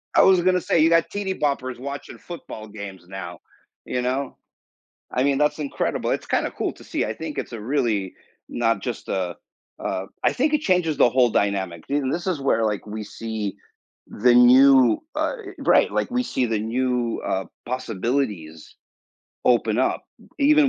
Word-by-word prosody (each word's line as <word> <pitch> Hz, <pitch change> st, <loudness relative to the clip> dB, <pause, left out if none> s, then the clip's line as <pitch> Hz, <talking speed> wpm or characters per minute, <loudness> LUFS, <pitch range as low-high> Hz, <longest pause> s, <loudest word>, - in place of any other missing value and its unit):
I -, -, +7 dB
was 190 Hz, -2 st, +6 dB
gonna 180 Hz, 0 st, +2 dB
say 165 Hz, -, +1 dB
you 160 Hz, +1 st, +5 dB
got 165 Hz, 0 st, +3 dB
tv 195 Hz, -2 st, -3 dB
boppers 130 Hz, -4 st, -1 dB
watching 140 Hz, +2 st, -7 dB
football 170 Hz, -11 st, -9 dB
games 100 Hz, -4 st, -9 dB
now, 90 Hz, -3 st, -7 dB, 0.5 s
you 125 Hz, -, -2 dB
know? 130 Hz, +2 st, -2 dB, 0.7 s
I 125 Hz, -, +1 dB
mean, 140 Hz, -1 st, +2 dB
that's 150 Hz, +1 st, +1 dB
incredible. 140 Hz, -2 st, -2 dB
It's -, -, -2 dB
kinda -, -, 0 dB
cool -, -, -1 dB
to -, -, -16 dB
see. -, -, -2 dB
I 110 Hz, -, -3 dB
think 150 Hz, +6 st, -7 dB
it's -, -, -4 dB
a 115 Hz, -, -5 dB
really 110 Hz, -7 st, -1 dB, 0.3 s
not 115 Hz, -4 st, 0 dB
just 120 Hz, -3 st, -5 dB
a, 90 Hz, -3 st, -2 dB, 0.4 s
uh 95 Hz, -, -3 dB, 0.2 s
I -, -, +3 dB
think 295 Hz, +4 st, +1 dB
it 300 Hz, -, +2 dB
changes 180 Hz, -, +1 dB
the 120 Hz, -, +6 dB
whole 125 Hz, -1 st, +4 dB
dynamic. 95 Hz, -5 st, -1 dB
See 140 Hz, -, -1 dB
and 135 Hz, -2 st, 0 dB
this 175 Hz, +2 st, -3 dB
is 175 Hz, -6 st, 0 dB
where, 115 Hz, -4 st, +2 dB
like, 105 Hz, -1 st, -2 dB
we 105 Hz, +1 st, -5 dB
see 110 Hz, -1 st, -5 dB, 0.5 s
the 120 Hz, +3 st, +3 dB
new 125 Hz, 0 st, +7 dB, 0.2 s
uh, -, -, 0 dB, 0.2 s
right, -, -, +4 dB
like, -, -, -1 dB
we 250 Hz, 0 st, +1 dB
see 130 Hz, -, -1 dB
the 110 Hz, -1 st, 0 dB
new, 120 Hz, +1 st, -1 dB
uh, 95 Hz, 0 st, -1 dB, 0.2 s
possibilities 115 Hz, -, -3 dB, 0.7 s
open 115 Hz, -2 st, +3 dB
up 130 Hz, -, +1 dB, 0.4 s
even 295 Hz, 0 st, +5 dB
125 Hz, 175 wpm, -23 LUFS, 105-150 Hz, 0.7 s, I